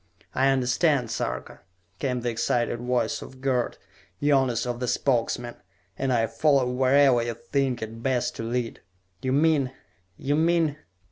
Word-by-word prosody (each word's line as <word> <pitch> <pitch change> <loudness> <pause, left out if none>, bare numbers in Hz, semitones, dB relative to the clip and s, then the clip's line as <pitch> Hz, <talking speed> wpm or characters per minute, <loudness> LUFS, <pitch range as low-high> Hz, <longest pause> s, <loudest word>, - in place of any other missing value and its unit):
"I 135 - +3
understand, 130 0 +2
Sarka!" - - -4 0.4
came 125 -3 -1
the 120 0 -1
excited 120 +1 0
voice 125 0 0
of 130 - -11
Gerd, 130 -2 0 0.4
youngest 130 -5 +2
of 120 -1 -3
the 125 - -2
Spokesmen. 120 -2 0 0.4
"And 135 -1 -1
I 115 -2 +3
follow 140 +3 +2
wherever 130 0 +4
you 115 0 -3
think 125 +1 -1
it 115 +1 -7
best 130 -1 0
to - - -4
lead! 120 0 -3 0.4
You 130 0 -1
mean... 140 -2 +2 0.4
you 145 +2 0
mean...." 160 -2 +2
125 Hz, 145 wpm, -26 LUFS, 120-140 Hz, 0.4 s, wherever